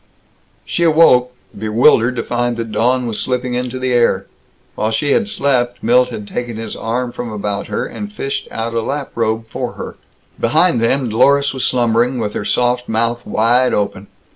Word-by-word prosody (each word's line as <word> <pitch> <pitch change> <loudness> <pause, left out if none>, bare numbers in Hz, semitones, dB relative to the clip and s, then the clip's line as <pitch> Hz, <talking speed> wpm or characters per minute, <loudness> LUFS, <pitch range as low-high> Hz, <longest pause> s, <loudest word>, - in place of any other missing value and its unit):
She - - -2
awoke, 155 -7 +5 0.2
bewildered 115 +3 +3
to 115 - -2
find 120 -1 -1
that 115 -1 -4
dawn 125 +3 +1
was 115 -3 -3
slipping 125 -1 -2
into 125 +1 -2
the 130 -1 -1
air. 115 -5 +2 0.5
While 110 - -1
she 125 +6 0
had 220 +4 +2
slept 130 - 0
Milt 125 +2 +4
had 105 -4 -7
taken 120 -1 -4
his 110 -1 -5
arm 120 +2 -2
from 120 -1 -6
about 105 -1 -3
her - - -2
and 210 0 -7
fished 140 -9 -4
out 115 +1 -4
a 115 - 0
lap 140 +4 -4
robe 115 -1 -1
for - - -4
her. - - -8 0.4
Behind 120 - +3
them, 125 +2 +1
Dlorus 140 +6 +3
was 130 - -1
slumbering, 120 +1 +1
with 105 -3 -2
her 105 - -4
soft 125 0 0
mouth 115 +2 0
wide 120 +3 +2
open. 100 -1 -2
120 Hz, 180 wpm, -17 LUFS, 115-125 Hz, 0.5 s, awoke